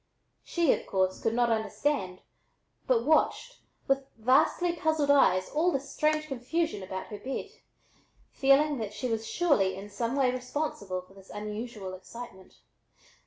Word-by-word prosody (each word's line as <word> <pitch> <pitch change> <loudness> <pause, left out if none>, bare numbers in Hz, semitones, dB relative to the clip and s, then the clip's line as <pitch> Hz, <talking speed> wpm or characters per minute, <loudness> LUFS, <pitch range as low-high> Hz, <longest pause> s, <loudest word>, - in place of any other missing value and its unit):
She, 340 -5 +2
of - - -5
course, 185 -1 0
could 225 - 0
not 240 -1 +3
understand, 220 -3 -1 0.7
but 235 -2 +2
watched 320 - +2 0.3
with 270 0 +1
vastly 265 +9 +3
puzzled 315 -3 +1
eyes 185 -10 +4
all 330 +4 +2
this 275 -2 -3
strange 305 0 +1
confusion 300 0 -2
about 190 0 -5
her 210 -2 -7
bed, 260 +6 -5 0.8
feeling 280 +1 +3
that 210 -2 -4
she 235 +5 -2
was 225 -1 -2
surely 215 - +2
in 200 +2 -9
some 230 +5 -2
way 265 -3 +3
responsible 250 -7 -3
for 185 +1 -20
this 195 -1 -16
unusual 210 -1 -6
excitement. 190 0 -10
245 Hz, 145 wpm, -29 LUFS, 205-290 Hz, 0.8 s, eyes